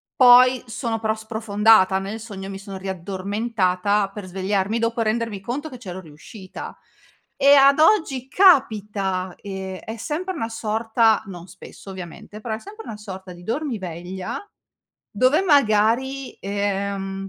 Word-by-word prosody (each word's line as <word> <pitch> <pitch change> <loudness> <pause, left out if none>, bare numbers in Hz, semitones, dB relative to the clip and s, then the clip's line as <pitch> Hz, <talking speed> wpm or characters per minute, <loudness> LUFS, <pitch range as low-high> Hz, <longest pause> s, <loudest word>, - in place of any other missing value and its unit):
poi 250 0 +7
sono 225 0 -3
però 220 -1 +1
sprofondata 220 -3 +3
nel 200 +3 -5
sogno 195 -4 -8
mi 195 - -6
sono 195 -1 -8
riaddormentata 195 +1 -1
per 210 -2 -7
svegliarmi 195 +3 -1
dopo 230 0 0
rendermi 220 -2 -1
conto 260 +9 -4
che 255 - -9
ce 200 -7 -8
l'ho 190 - -7
riuscita. 180 +5 -10 0.6
E 280 +1 +6
ad 275 +1 +6
oggi 310 - +3
capita, 210 - +2
ehm, 190 -2 -6
è 225 +1 -7
sempre 330 - -3
una 225 -7 -3
sorta, 225 0 +1
non 180 -2 -9
spesso 185 +2 -13
ovviamente, 190 +3 -9
però 220 -1 -3
è 220 - -8
sempre 430 - -11
una 220 - -6
sorta 190 -3 -9
di 175 0 -14
dormiveglia, 190 - -4 0.7
dove 255 - +3
magari, 265 - +2
ehm, 195 -1 -3
210 Hz, 140 wpm, -22 LUFS, 190-240 Hz, 0.7 s, poi